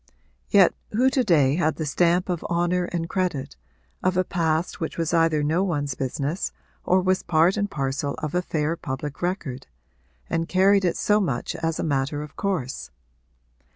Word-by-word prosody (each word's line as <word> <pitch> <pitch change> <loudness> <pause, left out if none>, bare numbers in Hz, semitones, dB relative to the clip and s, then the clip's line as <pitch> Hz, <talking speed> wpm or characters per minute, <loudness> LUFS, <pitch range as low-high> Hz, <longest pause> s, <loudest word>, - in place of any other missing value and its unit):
Yet 195 -3 +6 0.2
who 255 +5 +3
to 260 -1 +2
day 150 - +3
had 160 -3 +1
the 160 - -3
stamp 175 +4 +2
of 175 -3 -2
honour 175 +1 +1
and 170 -2 -3
credit 170 -8 -2 0.5
of 185 0 +1
a 185 - +4
past 165 -1 -1
which 160 - -4
was 165 0 -1
either 165 -3 +3
no 160 +5 +1
one's 145 -7 -1
business 140 +6 -2 0.3
or 185 +1 +3
was 185 0 +2
part 170 +2 +3
and 205 -1 -1
parcel 140 -1 -2
of 155 -2 -5
a 180 - +2
fair 160 -2 -1
public 145 -1 -5
record 175 -8 -3 0.6
and 165 0 -1
carried 195 +1 +4
it 175 - +1
so 210 0 +3
much 140 - -2
as 165 0 -1
a - - -1
matter 145 0 -1
of 150 - -11
course? 175 -11 -3
165 Hz, 175 wpm, -24 LUFS, 150-185 Hz, 0.6 s, Yet